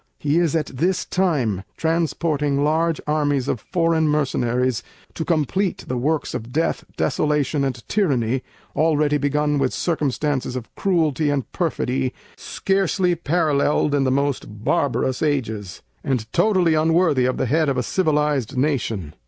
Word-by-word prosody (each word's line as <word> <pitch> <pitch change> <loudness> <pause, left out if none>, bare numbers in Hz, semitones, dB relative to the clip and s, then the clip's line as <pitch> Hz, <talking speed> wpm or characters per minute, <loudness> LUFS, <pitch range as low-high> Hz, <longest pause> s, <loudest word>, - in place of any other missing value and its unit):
He 150 +3 +1
is 165 -3 +1
at 155 -2 +1
this 175 +9 -1
time 135 - 0
transporting 155 -3 0
large 160 +2 +1
armies 145 -3 0
of 125 - -1
foreign 165 - +1
mercenaries 125 -5 0 0.3
to 160 - -3
compleat 170 +4 0
the 130 - -2
works 145 +5 -1
of 115 +2 -5
death, 160 +5 0
desolation 150 0 +1
and 125 -3 -3
tyranny, 130 - +1 0.3
already 150 -1 +2
begun 145 +1 +1
with 135 -2 0
circumstances 145 -5 -1
of 125 -3 -7
Cruelty 160 -6 +1
& - - -44
perfidy 135 -6 -1 0.2
scarcely 190 -2 0
paralleled 150 -3 +1
in 140 -1 +2
the 130 - +2
most 130 -6 -2
barbarous 130 -1 0
ages, 110 - -2 0.2
and 125 -5 -1
totally 185 -6 +3
unworthy 160 -4 +3
of 130 - 0
the - - 0
Head 155 +4 +2
of 135 - 0
a 125 - +1
civilized 150 - 0
nation. 115 - -1
145 Hz, 140 wpm, -22 LUFS, 130-160 Hz, 0.3 s, totally